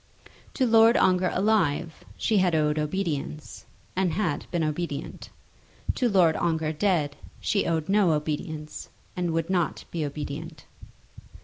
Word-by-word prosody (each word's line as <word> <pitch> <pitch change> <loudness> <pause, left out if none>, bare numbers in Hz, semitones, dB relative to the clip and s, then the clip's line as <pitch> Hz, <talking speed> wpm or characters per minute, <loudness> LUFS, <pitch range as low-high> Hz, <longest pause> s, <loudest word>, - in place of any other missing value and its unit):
To 265 - +2
Lord 225 0 +6
Ongar 185 0 +3
alive 175 -6 +1
she 220 - +1
had 180 -3 +2
owed 150 0 +2
obedience, 150 -2 -3 0.3
and 185 -3 +1
had 170 -4 -1
been 170 -2 -1
obedient. 155 -1 -4 0.6
To 245 - +1
Lord 175 -6 +4
Ongar 160 -2 0
dead 155 -4 +1 0.2
she 200 - 0
owed 160 -2 0
no 195 -4 +4
obedience, 150 0 -4 0.3
and 180 -1 -1
would 165 +2 -1
not 175 -4 0
be 165 -2 -2
obedient. 150 +2 -6
165 Hz, 130 wpm, -26 LUFS, 155-190 Hz, 0.6 s, Lord